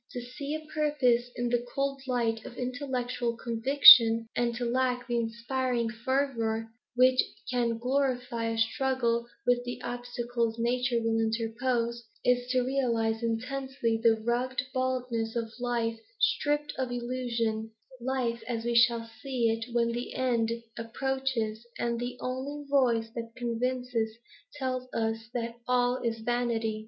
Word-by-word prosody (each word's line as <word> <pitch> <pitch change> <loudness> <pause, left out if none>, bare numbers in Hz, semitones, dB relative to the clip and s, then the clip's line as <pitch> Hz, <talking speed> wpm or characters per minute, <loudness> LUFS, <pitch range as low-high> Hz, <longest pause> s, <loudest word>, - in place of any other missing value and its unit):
To 245 - -3
see 275 +5 -5
a 310 0 -6
purpose 265 -6 +2
in 245 0 -1
the 240 0 +1
cold 275 0 -1
light 230 -3 0
of 245 - -10
intellectual 250 -2 -2
conviction, 230 -1 +7
and 240 -1 +1
to 245 0 -2
lack 250 0 0
the 240 -1 0
inspiring 235 +1 -1
fervour 230 -2 -1 0.2
which 255 +1 +5 0.3
can 235 -2 +1
glorify 250 -2 0
a 225 - -2
struggle 235 -1 +1 0.2
with 245 0 +3
the 245 0 -5
obstacles 240 -1 -2
nature 240 +1 +1
will 225 0 +1
interpose, 235 +1 -1 0.2
is 245 0 +2
to 255 0 +2
realise 235 -4 0
intensely 235 0 -1
the 225 -1 +4
rugged 245 +3 -1
baldness 250 -3 -1
of 225 -1 -3
life 235 -2 -1 0.2
stripped 295 0 +1
of 260 -1 -1
illusion, 240 -3 -2 0.3
life 240 -2 -1
as 230 -1 -3
we 240 - 0
shall 235 -1 +4
see 250 -5 +1
it 225 +2 -4
when 235 0 +2
the 240 +1 -4
end 240 -3 +1 0.3
approaches 235 -2 -2
and 235 -1 -1
the 245 +1 -4
only 275 +3 -4
voice 240 -5 +2
that 230 -1 -6
convinces 240 -1 -2 0.4
tell 255 -2 -3
us 225 0 -2
that 235 0 -3
all 250 0 +2
is 230 -1 -2
vanity. 230 -2 0
240 Hz, 140 wpm, -29 LUFS, 230-255 Hz, 0.4 s, conviction